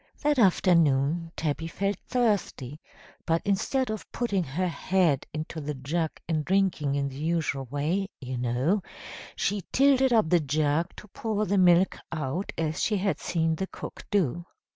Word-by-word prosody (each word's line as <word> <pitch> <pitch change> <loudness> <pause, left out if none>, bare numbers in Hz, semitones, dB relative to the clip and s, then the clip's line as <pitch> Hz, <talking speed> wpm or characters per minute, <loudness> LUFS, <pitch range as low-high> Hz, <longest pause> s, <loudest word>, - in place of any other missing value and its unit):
That 295 -2 +2
afternoon 165 - +3
Tabby 160 +1 -2
felt 200 +4 -2
thirsty, 200 - 0 0.4
but 165 0 +1
instead 215 +5 0
of 215 - -6
putting 205 -6 0
her 170 +6 -2
head 175 -4 +1
into 155 +1 -5
the 150 0 -4
jug 155 +5 -1 0.2
and 155 -2 0
drinking 180 -6 +1
in 140 -1 0
the 135 -1 -8
usual 155 -3 -1
way, 155 - -1
you 130 -2 -5
know 125 - +1 0.5
she 205 0 0
tilted 265 -1 +4
up 220 -8 +4
the 175 - +6
jug 155 +3 0
to 210 - -11
pour 215 +1 -2
the 200 +1 +2
milk 180 +1 +4
out 155 +4 -3
as 160 -1 -1
she 210 - +1
had 195 +1 0
seen 165 -2 0
the 190 - -2
cook - - -9
do. 175 -3 0
170 Hz, 160 wpm, -27 LUFS, 150-195 Hz, 0.5 s, the